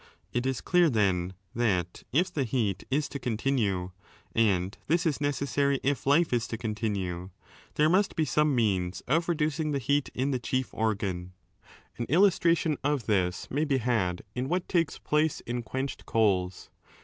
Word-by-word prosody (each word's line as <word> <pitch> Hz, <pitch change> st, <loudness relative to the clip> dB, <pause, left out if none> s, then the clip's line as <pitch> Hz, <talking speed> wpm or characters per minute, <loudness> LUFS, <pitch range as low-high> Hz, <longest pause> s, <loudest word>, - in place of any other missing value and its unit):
It 125 Hz, +1 st, 0 dB
is 130 Hz, -2 st, -1 dB
clear, 175 Hz, -2 st, +4 dB
then, 95 Hz, -6 st, +1 dB, 0.2 s
that 90 Hz, -7 st, 0 dB
if 175 Hz, +7 st, +1 dB
the 140 Hz, -, 0 dB
heat 105 Hz, -5 st, -1 dB
is 145 Hz, +2 st, +1 dB
to 140 Hz, -, -5 dB
continue 110 Hz, -7 st, 0 dB, 0.4 s
(and 100 Hz, -4 st, +2 dB
this 170 Hz, +3 st, +2 dB
is 150 Hz, -3 st, 0 dB
necessary 140 Hz, 0 st, +1 dB
if 140 Hz, 0 st, -1 dB
life 155 Hz, +1 st, +4 dB
is 120 Hz, 0 st, +1 dB
to 115 Hz, -, -4 dB
continue), 100 Hz, -5 st, -3 dB, 0.5 s
there 150 Hz, -, +4 dB
must 190 Hz, +5 st, +2 dB
be 160 Hz, -, +1 dB
some 150 Hz, 0 st, +2 dB
5 140 Hz, -, +1 dB
means 95 Hz, -6 st, 0 dB
of 165 Hz, +6 st, 0 dB
reducing 155 Hz, -2 st, 0 dB
the -, -, +1 dB
heat 140 Hz, +2 st, 0 dB
in 135 Hz, +3 st, 0 dB
the 130 Hz, -, 0 dB
chief 130 Hz, +1 st, -2 dB
organ. 95 Hz, -5 st, -2 dB, 0.7 s
An 120 Hz, -, -2 dB
illustration 170 Hz, -2 st, +3 dB
of 140 Hz, -4 st, 0 dB
this 95 Hz, -4 st, 0 dB
may 145 Hz, +4 st, +1 dB
be 140 Hz, -3 st, +1 dB
had 110 Hz, -8 st, 0 dB
in 125 Hz, +2 st, -3 dB
what 180 Hz, +1 st, -1 dB
takes 165 Hz, -5 st, +1 dB
place 150 Hz, 0 st, 0 dB
in 120 Hz, +1 st, -3 dB
quenched 130 Hz, +4 st, -5 dB
coals. 95 Hz, -5 st, +1 dB
125 Hz, 170 wpm, -28 LUFS, 105-150 Hz, 0.7 s, clear